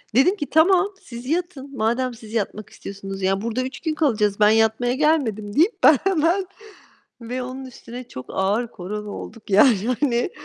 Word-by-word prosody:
Dedim 360 +10 +5
ki, 295 - -4
"Tamam, 365 +5 +4
siz 240 0 -10
yatın. 290 -3 -3
Madem 240 +3 0
siz 220 -1 -12
yatmak 215 -1 -3
istiyorsunuz. 195 0 -8
Ya, 195 +1 +1
burada 230 +3 -2
3 260 +1 -5
gün 315 -2 -2
kalacağız. 215 -9 +1
Ben 210 0 +6
yatmaya 225 +2 +2
gelmedim." 245 -9 0
deyip 345 +10 +2
ben 305 - +8
hemen 370 +1 +1 0.7
Ve 250 +2 -4
onun 260 +1 -7
üstüne 245 -1 -10
çok 125 - -9
ağır 205 +5 0
korona 210 +1 -6
olduk. 215 +1 -9
Yani, 210 +1 +5
hani, 245 +1 +1
245 Hz, 165 wpm, -22 LUFS, 210-290 Hz, 0.7 s, ben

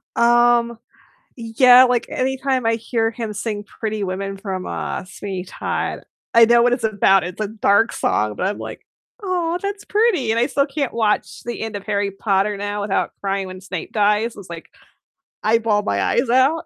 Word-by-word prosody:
Um, 235 0 +3 0.6
yeah, 245 +2 +6
like, 250 -1 +1
anytime 265 -1 -1
I 225 - +2
hear 225 0 -1
him 225 -2 -5
sing 205 0 -4
Pretty 215 0 -4
Women 195 +1 -4
from, 190 -2 -5
uh, - - -4
Sweeney 190 -1 -6
Todd - - -3 0.4
I 230 -1 +8
know 235 0 +5
what 245 0 +3
it's 245 - -2
about, 200 -3 +3
it's 180 +3 -7
a 215 - -1
dark 215 +1 +2
song, 105 0 0
but 185 - -1
I'm, 205 - -3
like, - - -8 0.4
"Aw, 355 -2 -1
that's 400 +1 -5
pretty." 410 - +1
And 230 - +1
I 240 - +2
still 280 0 +1
can't 280 -2 -3
watch 220 -2 -1
the 240 0 -5
end 220 -1 -4
of 200 -1 -7
Harry 200 -1 0
Potter 195 +1 0
now 205 0 -3
without 200 -1 -1
crying 195 -1 -1
when 185 0 -9
Snape 185 -2 -6
dies, 210 +2 +1
it's 195 -4 -12
like, 165 -1 -9 0.7
I 225 +2 +3
bawl 210 -2 +1
my 100 - -1
eyes 245 +1 +1
out. 265 +7 +2
225 Hz, 185 wpm, -20 LUFS, 200-245 Hz, 0.7 s, I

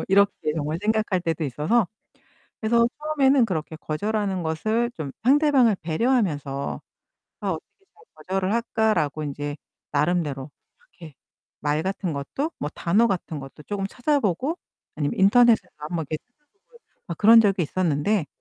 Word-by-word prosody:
뭐 - - -3
이렇게 200 +1 +5 0.2
정말 155 +2 -2
생각할 215 -3 +1
때도 165 -2 -2
있어서. 155 - +1 0.7
그래서 235 +1 +3
처음에는 280 -4 +3
그렇게 160 -6 -3
거절하는 195 +4 -2
것을 215 +10 0
좀 145 -4 -5
상대방을 265 -4 +4
배려하면서 160 - 0 0.6
'아, - - -3
어떻게 390 - -8
잘 435 - -21
거절을 190 +1 -2
할까?'라고 220 -10 0
인제 145 +1 -4 0.3
나름대로 150 -2 0 0.5
이렇게 160 -5 -11 0.5
말 150 +2 0
같은 190 -2 -2
것도 145 - -3
뭐 145 - -2
단어 205 +7 +3
같은 170 -5 -3
것도 135 +2 -11
쪼금 200 -1 -3
찾아보고 265 - 0 0.4
아니면 145 +2 -2
인터넷에서 220 +1 +5
한번 155 +1 -4
이렇게 155 - -4
찾아보고 350 - -26 0.3
어, 170 - -1
그런 225 +6 +7
적이 195 -4 +2
있었는데 165 +2 0
190 Hz, 340 characters per minute, -24 LUFS, 155-230 Hz, 0.7 s, 그런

